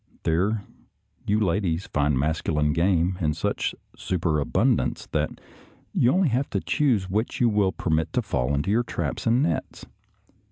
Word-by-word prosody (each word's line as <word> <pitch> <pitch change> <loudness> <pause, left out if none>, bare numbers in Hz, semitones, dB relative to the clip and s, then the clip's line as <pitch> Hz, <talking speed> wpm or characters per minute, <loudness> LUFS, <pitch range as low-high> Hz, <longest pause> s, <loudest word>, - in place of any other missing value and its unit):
There, 100 +6 +1 0.6
you 105 +1 +2
ladies 95 -3 0
find 75 -2 +1
masculine 75 +1 0
game 90 +1 +1
in 75 -2 +1
such 80 - -1 0.2
super 85 -4 -1
abundance - - +1
that - - -1 0.5
you 120 - +3
have - - +3
only 140 -9 +2
to - - -1
choose 125 -11 +1
which 105 +5 -2
you 120 - +4
will 105 -3 +2
permit 80 -4 -1
to - - +1
fall 60 +3 0
into 70 +8 -1
your 115 +3 +3
traps 120 - -3
and 120 +4 +3
nets. 80 - -3
90 Hz, 155 wpm, -25 LUFS, 80-110 Hz, 0.6 s, you